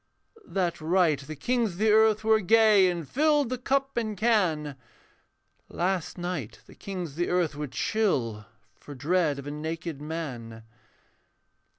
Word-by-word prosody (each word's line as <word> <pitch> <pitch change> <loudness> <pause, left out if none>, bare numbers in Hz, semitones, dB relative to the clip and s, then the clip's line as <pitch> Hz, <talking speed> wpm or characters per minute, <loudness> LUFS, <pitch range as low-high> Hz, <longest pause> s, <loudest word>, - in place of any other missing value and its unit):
That 180 -4 -2
right 165 -3 +2
the 145 +3 -8
kings 230 - 0
of - - -12
the 215 +2 +3
earth 215 0 +4
were 220 0 +4
gay 215 -2 +5
And 170 -4 -4
filled 295 - +2
the 255 -1 -3
cup 275 +1 -1
and 215 -3 -2
can; 180 -11 +1 0.9
Last 180 0 -2
night 175 -10 -4
the - - -16
kings 185 -5 -6
of - - -16
the 175 - 0
earth 175 -4 +1
were 150 0 -5
chill 125 - -1 0.3
For 145 - -12
dread 155 +1 +1
of 140 - -8
a 145 - -5
naked 160 0 -5
man. 130 -8 -6
175 Hz, 155 wpm, -27 LUFS, 150-215 Hz, 0.9 s, gay